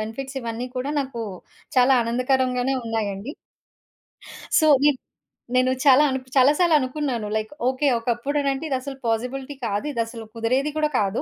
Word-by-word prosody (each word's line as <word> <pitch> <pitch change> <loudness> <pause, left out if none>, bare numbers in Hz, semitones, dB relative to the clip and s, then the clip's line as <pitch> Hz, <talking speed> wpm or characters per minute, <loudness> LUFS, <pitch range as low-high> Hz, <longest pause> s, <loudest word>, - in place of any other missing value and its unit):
Benefits 265 +5 -5
ఇవన్నీ 235 +2 -4
కూడా 265 +3 -2
నాకు 260 -4 -5 0.5
చాలా 255 +1 +6
ఆనందకరంగానే 255 +2 +1
ఉన్నాయండి. 220 +1 -3 1.3
సో, 315 - +4 0.2
ఇప్ 275 -3 0 0.6
నేను 255 0 +3
చాలా 275 0 +7
అను 265 0 -1 0.2
చాలా 260 +2 +7
సార్లు 345 -3 +4
అనుకున్నాను. 255 -4 -2
Like 215 0 -4 0.2
okay. 265 +3 0
ఒకప్పుడనంటే 275 +5 -1
ఇదసలు 270 0 -3
పాజిబిలిటీ 250 +5 -2
కాదు, 205 +4 -2
ఇదసలు 230 -1 -4
కుదిరేది 255 +6 0
కూడా 305 -1 +2
కాదు. 200 +1 0
255 Hz, 135 wpm, -23 LUFS, 230-275 Hz, 1.3 s, చాలా